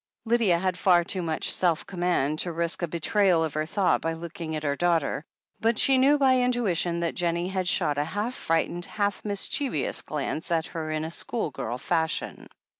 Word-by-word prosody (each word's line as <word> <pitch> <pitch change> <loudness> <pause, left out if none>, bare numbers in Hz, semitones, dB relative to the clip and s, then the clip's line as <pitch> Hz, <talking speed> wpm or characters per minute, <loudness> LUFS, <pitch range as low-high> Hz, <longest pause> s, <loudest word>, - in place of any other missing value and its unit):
Lydia 225 -6 +3
had 185 0 -1
far 175 -2 +5
too 185 +2 -2
much 160 -2 0
self 170 -3 +1
command 175 -5 0
to 175 - 0
risk 170 +1 -2
a 175 - 0
betrayal 170 +1 +2
of 160 -3 -3
her 155 +1 -2
thought 190 +2 +1
by 165 - -1
looking 165 -1 -6
at 155 - -4
her 140 -1 0
daughter, 165 -3 +1 0.4
but 230 0 +1
she 265 +2 +5
knew 280 +3 +5
by 260 -2 +4
intuition 195 -9 +1
that 170 - -1
Jennie 170 +1 -1
had 190 -1 -2
shot 145 -3 +1
a - - +2
half 205 +9 -3
frightened, 170 -2 -1
half 205 -1 -2
mischievous 205 - -1
glance 150 +1 -4
at 165 -1 +1
her 160 -1 -5
in 155 0 -2
schoolgirl 150 - -3
fashion. 160 +4 -2
175 Hz, 185 wpm, -26 LUFS, 160-200 Hz, 0.4 s, far